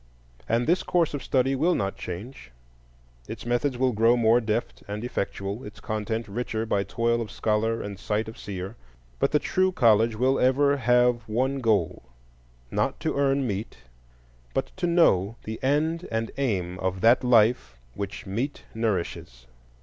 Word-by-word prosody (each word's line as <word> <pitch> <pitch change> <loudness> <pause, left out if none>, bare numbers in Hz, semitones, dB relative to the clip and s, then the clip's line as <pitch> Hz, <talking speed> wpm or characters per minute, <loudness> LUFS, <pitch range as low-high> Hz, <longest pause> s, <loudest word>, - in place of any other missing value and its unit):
And 115 +2 +2
this 175 +5 +2
course 170 -4 +1
of 145 - -3
study 135 0 +1
will 165 +6 +2
not 100 0 -1
change; 90 - -8 0.8
its - - -7
methods 120 +2 0
will 130 0 +2
grow 115 +2 +3
more 115 +1 +4
deft 115 +1 -2
and 105 +2 -5
effectual, 100 -2 -3
its 105 - -10
content 110 0 -3
richer 110 +1 -3
by 100 -3 +1
toil 115 +4 0
of 110 - -5
scholar 110 +2 0
and 100 -2 -7
sight 105 +1 -1
of 110 - -8
seer; 95 +1 -6 0.4
but - - +2
the 150 - +4
true 185 +5 +1
college 115 - +4
will 130 +4 +2
ever 140 +2 +3
have 125 -1 +3
one 130 +5 0
goal,—not - - -3
to - - -2
earn 140 -1 +2
meat, 105 -1 -4 0.8
but - - -1
to 180 -2 0
know 115 - +3
the 110 +1 -6
end 155 +6 0
and 115 0 -2
aim 90 -9 -1
of 95 0 -2
that 120 +4 +5
life 110 - +3 0.2
which 100 +8 -6
meat 120 +9 -3
nourishes. 90 - -3
115 Hz, 155 wpm, -26 LUFS, 100-130 Hz, 0.8 s, that